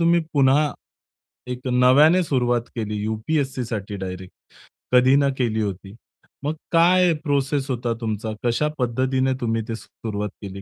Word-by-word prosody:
तुम्ही 170 Hz, +1 st, +4 dB
पुन्हा 145 Hz, +1 st, +3 dB, 0.8 s
एक 125 Hz, +1 st, -6 dB
नव्याने 135 Hz, +8 st, +5 dB
सुरुवात 125 Hz, -6 st, +1 dB
केली 105 Hz, -2 st, -3 dB
यूपी-एस-सीसाठी 110 Hz, -2 st, -2 dB
डायरेक्ट, 95 Hz, -1 st, -7 dB, 0.6 s
कधी 125 Hz, +2 st, +6 dB
ना 140 Hz, 0 st, +3 dB
केली 110 Hz, -4 st, 0 dB
होती. 100 Hz, 0 st, -5 dB, 0.5 s
मग 150 Hz, +2 st, -1 dB, 0.2 s
काय 175 Hz, +1 st, +5 dB
प्रोसेस 140 Hz, -2 st, 0 dB
होता 120 Hz, -2 st, -1 dB
तुमचा? 110 Hz, -1 st, -3 dB
कशा 120 Hz, +6 st, +1 dB
पद्धतीने 130 Hz, +2 st, 0 dB
तुम्ही 115 Hz, -1 st, 0 dB
ते 115 Hz, -, -3 dB
सुरुवात 105 Hz, -2 st, -6 dB
केली 100 Hz, -1 st, -7 dB
125 Hz, 130 wpm, -22 LUFS, 110-140 Hz, 0.8 s, कधी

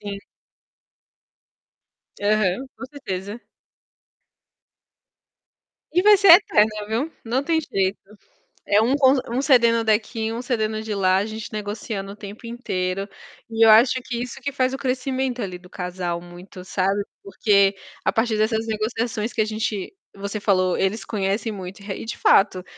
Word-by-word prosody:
Sim. 200 Hz, -1 st, -6 dB, 2.0 s
Aham, 210 Hz, +3 st, +1 dB
com -, -, -8 dB
certeza. 205 Hz, -6 st, -6 dB, 2.5 s
E 360 Hz, +3 st, +2 dB
vai 420 Hz, 0 st, +8 dB
ser 385 Hz, -3 st, +8 dB
eterno, 220 Hz, -, +5 dB, 0.2 s
viu, 245 Hz, +9 st, -2 dB
não 250 Hz, +4 st, 0 dB
tem 325 Hz, +1 st, +1 dB
jeito. 195 Hz, -9 st, -1 dB, 0.7 s
É 205 Hz, +1 st, +4 dB
um 255 Hz, +5 st, +2 dB
con 270 Hz, -1 st, +5 dB
um 245 Hz, +3 st, 0 dB
cedendo 235 Hz, -5 st, +4 dB
daqui, 220 Hz, +1 st, 0 dB
um 235 Hz, +2 st, -4 dB
cedendo 220 Hz, -3 st, -1 dB
de 220 Hz, -1 st, -5 dB
lá, 185 Hz, -2 st, +2 dB
a 200 Hz, -, 0 dB
gente 220 Hz, 0 st, -7 dB
negociando 205 Hz, -1 st, -5 dB
o -, -, -12 dB
tempo 210 Hz, +2 st, -10 dB
inteiro. 195 Hz, -5 st, -3 dB, 0.4 s
E 225 Hz, 0 st, +3 dB
eu 225 Hz, -, +7 dB
acho 235 Hz, +4 st, +6 dB
que 235 Hz, -2 st, -4 dB
isso 250 Hz, +2 st, -6 dB
que 280 Hz, -, -2 dB
faz 260 Hz, -1 st, 0 dB
o -, -, -1 dB
crescimento, 260 Hz, -1 st, -2 dB
ali, 185 Hz, -4 st, -5 dB
do 180 Hz, 0 st, -18 dB
casal 180 Hz, -1 st, -4 dB
muito, 175 Hz, +1 st, -12 dB
sabe, 195 Hz, +2 st, 0 dB, 0.2 s
porque 200 Hz, 0 st, +2 dB, 0.3 s
a -, -, +2 dB
partir 225 Hz, -1 st, +1 dB
dessas 220 Hz, +1 st, 0 dB
negociações 220 Hz, +1 st, -2 dB
que 225 Hz, -, -2 dB
a -, -, +4 dB
gente 215 Hz, -, -3 dB, 0.2 s
você 200 Hz, +1 st, -5 dB
falou, 185 Hz, -3 st, +2 dB
eles 195 Hz, +4 st, -1 dB
conhecem 205 Hz, +2 st, -2 dB
muito. 190 Hz, -1 st, -8 dB
Eh, 200 Hz, -1 st, -5 dB
e -, -, -6 dB
de 225 Hz, -, -6 dB
fato, 190 Hz, -2 st, +3 dB
215 Hz, 155 wpm, -22 LUFS, 195-240 Hz, 2.5 s, vai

